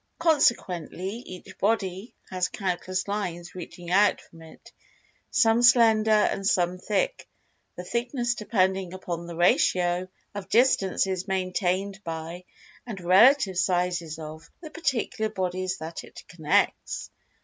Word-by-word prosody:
Consequently, 200 - +1
each 185 -1 -11
body 200 0 -1 0.2
has 185 -1 0
countless 185 0 -3
lines 180 -4 -4
reaching 175 -1 -9
out 205 +3 +4
from 165 - -17
it; 160 -1 -15 0.6
some 230 -3 +3
slender, 230 -3 +5
and 210 -2 +2
some 180 -2 +1
thick,—the 190 -2 -5
thickness 240 +4 -1
depending 190 -4 0
upon 170 -2 -5
the 170 - -7
ratio 175 +1 +2 0.3
of 200 -2 -7
distances 190 -4 +2
maintained 190 +1 -1
by, 165 +2 -6 0.4
and 215 -5 -6
relative 190 +2 +5
sizes 175 -3 0
of, 155 +1 -9
the 315 -3 -10
particular 255 -8 -2
bodies 185 -2 -3
that 160 +1 -7
it - - -13
connects. 160 -3 -1
185 Hz, 115 wpm, -26 LUFS, 175-215 Hz, 0.6 s, slender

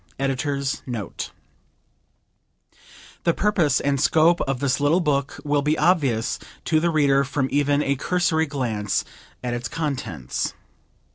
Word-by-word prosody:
EDITOR'S 135 0 -1
NOTE 115 -7 -5 1.9
The 170 - +2
purpose 180 - +2
and 140 -1 0
scope 165 +2 +4
of 135 -2 -1
this 140 0 +1
little 145 +5 +3
book 140 -5 -1
will 145 0 +2
be 150 +2 +1
obvious 145 -9 +2 0.3
to 155 - +3
the 170 +2 +1
reader 140 -4 +3
from 135 0 -1
even 145 0 +2
a 140 - +1
cursory 160 +1 +1
glance 115 -8 -1 0.4
at 120 -1 -2
its 120 0 -3
contents. 135 - -3
140 Hz, 130 wpm, -23 LUFS, 130-155 Hz, 1.9 s, scope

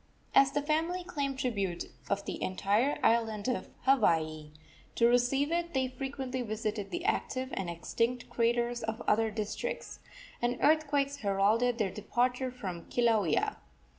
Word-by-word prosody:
As 275 0 +6
the 290 - 0
family 325 +4 0
claimed 280 -6 -3
tribute 200 -9 -1 0.2
of 200 - -1
the - - -5
entire 205 +9 +1
island 225 -2 +2
of 250 - -2
Hawaii, 160 - +2 0.5
to 235 - +4
receive 245 +5 +2
it 340 -2 -1
they 260 -1 +1
frequently 260 0 -4
visited 215 -2 -3
the 350 +1 -4
active 260 -11 -1
and 190 -3 -2
extinct 230 +9 -1
craters 240 +1 +1
of 220 +1 -3
other 220 +1 +3
districts, 215 -1 -4 0.4
and 240 +1 0
earthquakes 285 -2 +2
heralded 215 +3 +2
their 205 -5 0
departure 245 +5 0
from 190 -9 -6
Kilauea. 220 -9 +2
240 Hz, 135 wpm, -31 LUFS, 210-270 Hz, 0.5 s, As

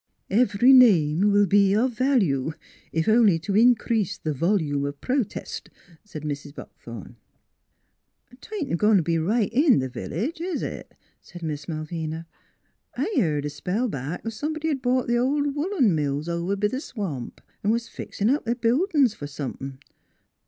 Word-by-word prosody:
u 200 - +2
Ev 210 -5 +2
ery 245 +6 +6
name 200 - +5
will 205 0 +4
be 200 0 +4
of 245 +4 +2
value, 200 - +1 0.4
if 160 0 -1
only 220 -5 +5
to 195 +5 -3
in 240 +3 +6
crease 210 -4 -1
the 155 - -3
volume 150 -2 0
of 140 0 -4
pro 260 +2 +1
test," 215 - -7 0.3
said 165 -8 -9
Mrs. 145 -1 -5
Buck - - -10
thorn. 115 -5 -10 0.6
" 250 - -27
'Tain't 320 - -3
goin' 210 0 +5
t' 175 - +2
be 165 +1 0
right 210 +6 0
in 275 +1 +5
the 130 - 0
village, 245 - -4
is 360 0 -2
it? - - -7
" - - -42
asked 175 -1 -11
Miss 150 -2 -4
Malvina. 160 0 -4 0.4
" - - -31
I 440 - -1
heared 150 - +1
a - - -1
spell 185 - -2
back 145 - -5
somebody' 310 +7 -3
d 285 -3 -1
bought 255 0 0
th' - - -1
old 285 +3 +1
woolen 295 - +1
mills 145 0 -1
over 170 +3 -1
b' 205 +1 -1
the 255 +6 -4
swamp, 180 - -6 0.2
an' 205 - +1
was 230 +1 0
fixin' 205 - -4
up 290 - 0
th' 235 +2 -1
buildin's 270 - +2
fer 145 - -7
some 140 -2 -5
thin'.. 135 -1 -8
200 Hz, 185 wpm, -24 LUFS, 155-250 Hz, 0.6 s, ery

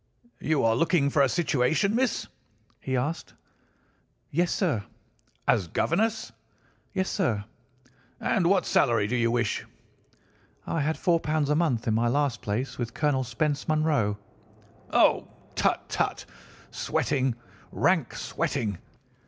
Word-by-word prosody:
"'You 155 -2 +1
are 115 0 +3
looking 160 0 +2
for 145 - +3
a 135 - +4
situation, 150 - +1
miss?' 250 0 +1 0.5
he 130 -1 -2
asked. 150 +7 -3 1.0
"'Yes, 170 +4 +1
sir.' 145 - 0 0.6
"'As 90 - +3
governess?' 220 - 0 0.6
"'Yes, 190 0 -1
sir.' 115 - 0 0.7
"'And 190 -6 +1
what 185 -1 +3
salary 115 -6 +3
do 115 +5 -1
you 115 0 +2
ask?' 115 -3 -1 1.0
"'I 165 - -1
had 155 +2 0
£ - - -13
4 170 -3 +2 0.3
a - - +3
month 145 -9 +1
in 110 - +2
my 115 +2 +2
last 140 -1 0
place 115 +7 -3
with 120 -1 -4
Colonel 145 -3 +1
Spence 145 +3 -1
Munro.' 150 -10 +1 0.7
"'Oh, - - +4 0.3
tut, - - 0
tut! - - -1 0.5
sweating—rank 130 -4 -1
sweating! 100 -6 -2
140 Hz, 125 wpm, -27 LUFS, 120-165 Hz, 1.0 s, a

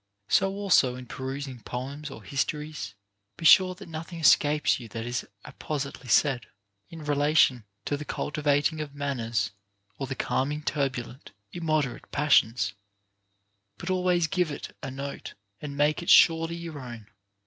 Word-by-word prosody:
So 195 - +4
also, 185 -11 +3
in 125 0 -8
perusing 130 0 -5
poems 140 +6 -6
or 115 -6 -10
histories, 140 -2 -3 0.4
be 170 - -6
sure 185 +2 +7
that - - -11
nothing 165 +1 -7
escape 150 -2 +4
you 120 - -9
that 115 +1 -6
is 120 0 -3 0.2
appositely 140 -3 -5
said, 120 -2 +3 0.4
in 165 -2 -9
relation 145 -5 +3 0.2
to 145 - 0
the 150 - -6
cultivating 150 +1 0
of 145 -2 -7
manners 120 -7 -1 0.5
or 135 - -3
the 135 - -4
calming 145 +4 -1
turbulent, 130 -5 -3 0.2
im 170 -1 -5
moderate 155 -5 -1
passions; 115 -8 +3 1.0
but 175 - -4
always 180 -2 +2
give 180 +1 0
it 145 - -7
a 135 - -5
note, 140 +1 -6 0.3
and 140 -1 -6
make 150 +3 +2
it 170 - -5
surely 165 0 +6
your 165 -3 -7
own. 120 -4 -9
145 Hz, 150 wpm, -27 LUFS, 130-155 Hz, 1.0 s, sure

